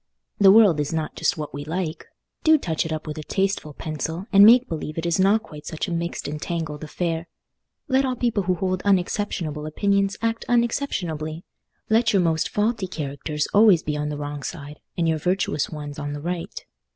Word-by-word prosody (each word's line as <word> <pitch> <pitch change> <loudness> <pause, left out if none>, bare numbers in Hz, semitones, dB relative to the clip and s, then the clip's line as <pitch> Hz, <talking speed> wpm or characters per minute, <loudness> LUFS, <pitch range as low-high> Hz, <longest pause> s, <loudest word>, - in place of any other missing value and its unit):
The 200 -1 +7
world 200 -7 +6
is 145 - -1
not 160 -2 -3
just - - 0
what 150 -1 -5
we 145 +1 -5
like; 160 +1 -4 0.4
do 315 0 +6
touch 165 - -2
it - - -6
up 155 -1 -3
with 155 0 -5
a - - -6
tasteful 190 -4 -1
pencil, 160 +3 -4
and 200 0 +8
make 245 +4 +7
believe 155 -1 -5
it 165 - -2
is 170 +1 +1
not 200 +4 +4
quite 150 -1 -11
such 160 - -3
a - - -4
mixed 170 +1 -3
entangled 150 0 -4
affair. 165 +1 -3 0.6
Let 265 -1 +3
all 260 -1 -1
people 235 -4 0
who 185 -1 0
hold 185 +1 -1
unexceptionable 180 -5 0
opinions 200 +4 +1
act 230 0 -1
unexceptionably. 180 - -1 0.4
Let 225 0 +3
your 195 - +4
most 160 -1 +1
faulty 210 -1 0
characters 150 -2 -3
always 205 -5 +6
be 150 - -2
on 150 0 -2
the 150 - -4
wrong 145 0 -5
side, 145 -1 -7 0.2
and 170 -1 +1
your 160 -1 +1
virtuous 180 -3 0
ones 150 -2 -7
on 145 0 -4
the 145 - -5
right. 175 +1 -5
170 Hz, 195 wpm, -23 LUFS, 155-200 Hz, 0.6 s, and